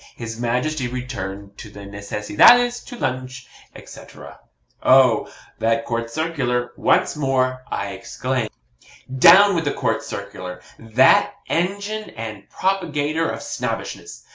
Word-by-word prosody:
His 115 Hz, -1 st, -7 dB
Majesty 125 Hz, +4 st, -1 dB
returned 100 Hz, -6 st, -6 dB
to 105 Hz, -, -9 dB
the 100 Hz, 0 st, -12 dB
Necessidades 105 Hz, -, +3 dB
to 245 Hz, -, -9 dB
lunch, 130 Hz, -, -4 dB, 0.3 s
at,' -, -, -13 dB
&c. -, -, -11 dB
&c.. -, -, -16 dB, 0.6 s
Oh! 130 Hz, -3 st, +4 dB, 0.3 s
that 115 Hz, 0 st, +1 dB
COURT 115 Hz, 0 st, -3 dB
CIRCULAR! 125 Hz, -4 st, -2 dB
once -, -, +2 dB
more, 130 Hz, -3 st, 0 dB
I 100 Hz, -, -3 dB
exclaim. 125 Hz, +4 st, -3 dB, 0.7 s
Down 190 Hz, +9 st, +7 dB
with 165 Hz, -3 st, -1 dB
the 145 Hz, -, 0 dB
COURT -, -, -1 dB
CIRCULAR 90 Hz, 0 st, -7 dB, 0.2 s
that 115 Hz, +3 st, +4 dB
engine 200 Hz, +5 st, -2 dB
and 110 Hz, -3 st, -7 dB
propagator 160 Hz, -4 st, -1 dB
of -, -, -5 dB
Snobbishness! -, -, -5 dB
130 Hz, 125 wpm, -21 LUFS, 115-155 Hz, 0.7 s, Down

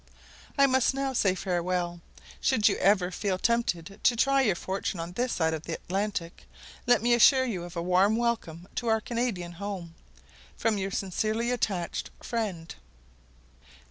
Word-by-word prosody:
I 275 Hz, -, +6 dB
must 260 Hz, 0 st, +2 dB
now 270 Hz, -1 st, -1 dB
say 195 Hz, -6 st, +2 dB
farewell. 175 Hz, -1 st, -2 dB, 0.4 s
Should 250 Hz, -6 st, +3 dB
you 200 Hz, -, +3 dB
ever 190 Hz, -2 st, +3 dB
feel 190 Hz, 0 st, -1 dB
tempted 195 Hz, -5 st, -1 dB
to 245 Hz, -, +4 dB
try 275 Hz, +3 st, +3 dB
your 210 Hz, -8 st, +2 dB
fortune 190 Hz, 0 st, -3 dB
on 165 Hz, +1 st, -5 dB
this 245 Hz, +6 st, -1 dB
side 160 Hz, -1 st, +1 dB
the 165 Hz, -, -5 dB
Atlantic, 190 Hz, -3 st, -4 dB, 0.4 s
let 245 Hz, -3 st, +4 dB
me 240 Hz, 0 st, +4 dB
assure 260 Hz, +3 st, +6 dB
you 195 Hz, -8 st, -3 dB
of 175 Hz, -, -10 dB
a 170 Hz, -, -2 dB
warm 185 Hz, +4 st, +3 dB
welcome 205 Hz, -8 st, -2 dB
to 240 Hz, -, -2 dB
our 220 Hz, -1 st, +3 dB
Canadian 225 Hz, -7 st, -3 dB
home, 180 Hz, -2 st, -6 dB, 0.6 s
from 220 Hz, -2 st, +1 dB
your 195 Hz, 0 st, -2 dB
sincerely 215 Hz, +5 st, -1 dB
attached 195 Hz, -8 st, -2 dB
friend. 200 Hz, -9 st, -4 dB
200 Hz, 155 wpm, -28 LUFS, 180-235 Hz, 0.6 s, I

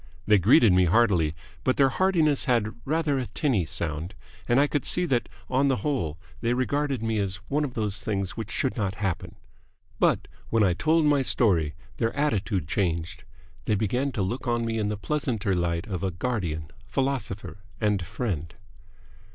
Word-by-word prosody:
They 105 Hz, -2 st, +5 dB
greeted 110 Hz, -, +6 dB
me 90 Hz, 0 st, +5 dB
heartily, 90 Hz, -5 st, +3 dB, 0.3 s
but 130 Hz, -, +1 dB
their 135 Hz, -1 st, +5 dB
heartiness 160 Hz, -4 st, +2 dB
had 115 Hz, -5 st, +1 dB
rather 150 Hz, -2 st, +1 dB
a 125 Hz, -, -3 dB
tinny 100 Hz, -, 0 dB
sound, 80 Hz, +4 st, -3 dB, 0.3 s
and 120 Hz, +2 st, +4 dB
I 145 Hz, -, +5 dB
could 145 Hz, -1 st, -1 dB
see 180 Hz, -, +3 dB
that 125 Hz, -7 st, 0 dB, 0.2 s
on 135 Hz, +2 st, +2 dB
the 135 Hz, -, +3 dB
whole 100 Hz, -, -1 dB, 0.2 s
they 120 Hz, +1 st, +1 dB
regarded 135 Hz, -1 st, 0 dB
me 110 Hz, -1 st, 0 dB
as 95 Hz, -2 st, -1 dB
one 150 Hz, +2 st, +1 dB
of 130 Hz, -4 st, -4 dB
those 105 Hz, -2 st, -1 dB
things 100 Hz, -3 st, -1 dB
which 110 Hz, -2 st, -6 dB
should 130 Hz, -, -1 dB
not 100 Hz, -4 st, -1 dB
happen. 95 Hz, -4 st, -3 dB, 0.6 s
But -, -, +2 dB, 0.2 s
when 115 Hz, -2 st, +3 dB
I 95 Hz, -3 st, +3 dB
told 155 Hz, -, +2 dB
my 145 Hz, -2 st, +4 dB
story 90 Hz, -, +2 dB, 0.2 s
their 115 Hz, -, -1 dB
attitude 105 Hz, -, 0 dB
changed. 85 Hz, +1 st, -2 dB, 0.4 s
They 105 Hz, -, +2 dB
began 125 Hz, +7 st, 0 dB
to 105 Hz, -6 st, -1 dB
look 120 Hz, +7 st, -3 dB
on 120 Hz, -1 st, +1 dB
me 115 Hz, -1 st, -1 dB
in 105 Hz, -1 st, 0 dB
the 105 Hz, -, -2 dB
pleasanter 115 Hz, -5 st, -1 dB
light 85 Hz, -1 st, -1 dB
of 95 Hz, -4 st, -4 dB
a 95 Hz, -, 0 dB
guardian, 85 Hz, -6 st, -3 dB, 0.2 s
philosopher, 130 Hz, -8 st, -2 dB, 0.2 s
and 105 Hz, -4 st, +1 dB
friend. 85 Hz, -4 st, -4 dB
110 Hz, 175 wpm, -26 LUFS, 95-135 Hz, 0.6 s, greeted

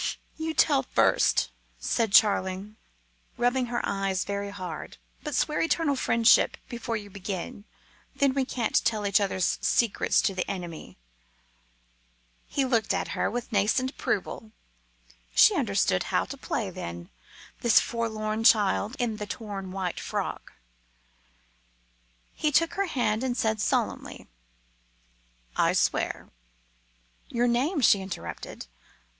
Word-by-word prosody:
"You 320 Hz, 0 st, -4 dB
tell 285 Hz, -4 st, +4 dB
first," 260 Hz, -, +2 dB, 0.3 s
said 225 Hz, -4 st, 0 dB
Charling, 200 Hz, 0 st, +3 dB, 0.6 s
rubbing 245 Hz, +1 st, +1 dB
her 240 Hz, 0 st, -2 dB
eyes 195 Hz, -2 st, -1 dB
very 200 Hz, 0 st, -3 dB
hard; 185 Hz, -5 st, -7 dB, 0.2 s
"but 300 Hz, -2 st, -4 dB
swear 300 Hz, -, +1 dB
eternal 325 Hz, -2 st, +1 dB
friendship 230 Hz, -2 st, +4 dB
before 235 Hz, -1 st, -3 dB
you 205 Hz, -1 st, -9 dB
begin, 195 Hz, +1 st, -6 dB, 0.5 s
then 275 Hz, -2 st, +2 dB
we 270 Hz, 0 st, +1 dB
can't 245 Hz, -3 st, 0 dB
tell 215 Hz, -2 st, 0 dB
each 200 Hz, 0 st, +3 dB
other's 190 Hz, -2 st, 0 dB
secrets 235 Hz, -4 st, +2 dB
to 200 Hz, -, +1 dB
the 185 Hz, -1 st, -3 dB
enemy." 175 Hz, -4 st, -6 dB, 1.5 s
He 275 Hz, -, 0 dB
looked 230 Hz, -5 st, +1 dB
at -, -, -2 dB
her -, -, -1 dB
with 245 Hz, +1 st, -5 dB
a -, -, -10 dB
nascent 215 Hz, +6 st, +2 dB
approval. 220 Hz, -5 st, -3 dB, 0.8 s
She -, -, +7 dB
understood -, -, +1 dB
how -, -, 0 dB
to -, -, -7 dB
play, -, -, -3 dB
then, 85 Hz, -2 st, -7 dB, 0.5 s
this 235 Hz, -2 st, +5 dB
forlorn 220 Hz, -2 st, -2 dB
child 215 Hz, 0 st, +4 dB
in 230 Hz, -3 st, -1 dB
the 210 Hz, -1 st, -5 dB
torn 200 Hz, -4 st, -6 dB
white 185 Hz, -2 st, -3 dB
frock. -, -, -4 dB, 1.8 s
He 305 Hz, -, 0 dB
took 330 Hz, +3 st, +3 dB
her 395 Hz, 0 st, -1 dB
hand 240 Hz, -7 st, 0 dB
and 255 Hz, -1 st, -1 dB
said 220 Hz, -2 st, 0 dB
solemnly -, -, -1 dB, 1.3 s
"I -, -, +3 dB
swear." -, -, 0 dB, 1.0 s
"Your 240 Hz, 0 st, +1 dB
name," 275 Hz, +7 st, +1 dB
she 205 Hz, -4 st, +5 dB
interrupted. 190 Hz, -2 st, -7 dB
220 Hz, 125 wpm, -27 LUFS, 200-250 Hz, 1.8 s, She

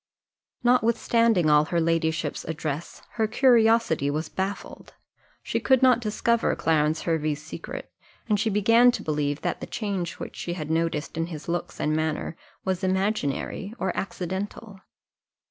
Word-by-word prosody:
Notwithstanding 230 Hz, -5 st, +3 dB
all 150 Hz, 0 st, +5 dB
her 170 Hz, +1 st, 0 dB
ladyship's 160 Hz, -2 st, 0 dB
address, 155 Hz, 0 st, -5 dB
her 220 Hz, -1 st, +2 dB
curiosity 225 Hz, -, +3 dB
was 155 Hz, +2 st, -2 dB
baffled; 195 Hz, +1 st, -5 dB, 0.5 s
she -, -, -1 dB
could 260 Hz, -1 st, +3 dB
not 255 Hz, -2 st, +6 dB
discover 230 Hz, +1 st, +1 dB
Clarence 155 Hz, -1 st, +1 dB
Hervey's 155 Hz, -3 st, -1 dB
secret, 160 Hz, -, -8 dB, 0.3 s
and 210 Hz, -2 st, +2 dB
she 220 Hz, -, +1 dB
began 230 Hz, +4 st, +5 dB
to -, -, -4 dB
believe 145 Hz, -1 st, -1 dB
that -, -, -2 dB
the -, -, -5 dB
change 200 Hz, -5 st, -3 dB
which -, -, -8 dB
she 175 Hz, -, -4 dB
had 155 Hz, -3 st, -5 dB
noticed 160 Hz, -1 st, -1 dB
in 165 Hz, 0 st, -1 dB
his 155 Hz, -3 st, -8 dB
looks 170 Hz, 0 st, -3 dB
and 155 Hz, +1 st, +1 dB
manner 155 Hz, +1 st, -2 dB, 0.3 s
was 190 Hz, 0 st, -1 dB
imaginary 190 Hz, +1 st, -1 dB
or 190 Hz, -4 st, -2 dB
accidental. 195 Hz, +2 st, -5 dB
180 Hz, 145 wpm, -26 LUFS, 155-220 Hz, 0.5 s, not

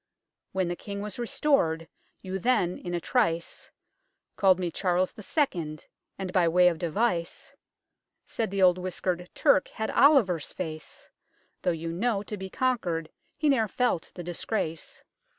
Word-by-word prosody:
When 190 Hz, -2 st, 0 dB
the 175 Hz, -, -2 dB
King 200 Hz, +2 st, -6 dB
was 210 Hz, +2 st, -5 dB
restored, 195 Hz, -, +1 dB, 0.4 s
you 190 Hz, 0 st, -3 dB
then, 180 Hz, -5 st, +1 dB
in 175 Hz, -1 st, -4 dB
a -, -, 0 dB
trice, 165 Hz, 0 st, -1 dB, 0.7 s
Called 190 Hz, -2 st, +4 dB
me 180 Hz, -2 st, -2 dB
Charles 180 Hz, +1 st, +1 dB
the -, -, -11 dB
Second, 175 Hz, -, -1 dB, 0.3 s
and, 185 Hz, -1 st, -5 dB
by 180 Hz, -2 st, +4 dB
way 180 Hz, +2 st, +5 dB
of 165 Hz, -2 st, -4 dB
device, 175 Hz, 0 st, -1 dB, 0.7 s
Said 225 Hz, -3 st, -2 dB
the 195 Hz, 0 st, 0 dB
old 180 Hz, 0 st, +5 dB
whiskered 180 Hz, -1 st, -3 dB
Turk -, -, +4 dB
had 220 Hz, -, -4 dB
Oliver's 220 Hz, -, +4 dB
face 155 Hz, -4 st, -7 dB, 0.5 s
Though, -, -, +1 dB
you 165 Hz, -1 st, -2 dB
know, 205 Hz, +3 st, 0 dB
to 210 Hz, -, -5 dB
be 190 Hz, -1 st, -7 dB
conquered, 180 Hz, -11 st, -1 dB, 0.3 s
he 305 Hz, -, +1 dB
ne'er 245 Hz, -6 st, +3 dB
felt 225 Hz, -5 st, 0 dB
the 175 Hz, -, -6 dB
disgrace. 170 Hz, -1 st, -4 dB
185 Hz, 150 wpm, -28 LUFS, 170-210 Hz, 0.7 s, way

